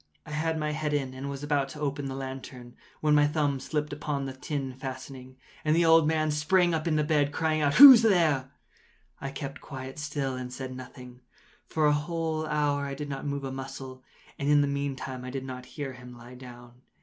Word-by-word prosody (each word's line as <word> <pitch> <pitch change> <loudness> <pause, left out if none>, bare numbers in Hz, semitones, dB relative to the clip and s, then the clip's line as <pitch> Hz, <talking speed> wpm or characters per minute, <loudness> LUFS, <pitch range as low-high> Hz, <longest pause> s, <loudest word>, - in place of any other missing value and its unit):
I - - -10
had 160 +2 -1
my 150 -1 -1
head 150 -1 -1
in, 135 -3 -2
and 135 +2 -6
was 140 0 -6
about 145 -2 0
to 150 - -9
open 145 -1 -2
the 135 - -5
lantern, 130 -2 -8 0.3
when 150 -1 +3
my 145 0 +5
thumb 145 -2 0
slipped 150 +2 -3
upon 145 -1 -3
the 135 - -5
tin 135 0 -4
fastening, 130 0 -8 0.3
and 155 0 +2
the 170 0 +3
old 165 -1 +6
man 155 -1 +1
sprang 175 +4 +2
up 160 +1 -1
in 160 - +1
bed, 145 -2 +2
crying 155 0 0
out—“Who’s 240 - +10
there?” 165 - +3 0.7
I 135 - -4
kept 140 +1 -7
quite 135 -1 -8
still 145 -3 -2
and 125 -1 -6
said 130 0 -6
nothing. 125 -1 -11 0.5
For 155 -1 0
a 150 - +5
whole 155 +1 -2
hour 145 -2 0
I 140 - -5
did 145 +1 -6
not 140 +1 -5
move 140 0 -3
a 135 - -4
muscle, 130 -1 -7 0.4
and 140 - -1
in 145 0 +5
the 145 - +1
meantime 140 -2 -4
I 130 - -6
did 130 0 -5
not 125 -1 -7
hear 140 -3 -4
him 125 0 -12
lie 120 +1 -12
down. 120 -1 -13
140 Hz, 210 wpm, -28 LUFS, 130-150 Hz, 0.7 s, out—“Who’s